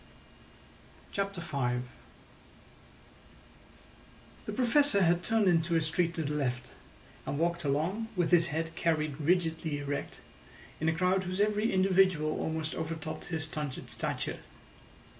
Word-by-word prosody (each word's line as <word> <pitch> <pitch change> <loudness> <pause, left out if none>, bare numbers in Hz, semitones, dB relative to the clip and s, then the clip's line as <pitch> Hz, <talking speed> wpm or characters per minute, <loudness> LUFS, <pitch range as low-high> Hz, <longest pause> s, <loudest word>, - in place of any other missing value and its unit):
CHAPTER 195 -2 -2
V 125 -6 -1 2.6
The - - -2
Professor 245 -2 +3
had 175 0 +3
turned 220 -1 +2
into 170 -1 +3
a 165 - +3
street 170 +2 0
to 160 - -1
the 150 0 -2
left, 125 -4 -2 0.6
and 140 - -2
walked 170 +2 0
along, 160 +10 0
with 175 -2 +1
his 170 -1 +5
head 160 +1 -3
carried 155 -3 0
rigidly 160 -2 +1
erect, 145 0 -4 0.6
in 160 - +2
a 160 - 0
crowd 185 +2 +2
whose 185 +2 -3
every 210 +2 +2
individual 185 -5 +3
almost 160 -1 -2
overtopped 160 -1 -5
his 160 -2 -3
stunted 150 -4 -5
stature. - - -3
165 Hz, 125 wpm, -31 LUFS, 155-185 Hz, 2.6 s, his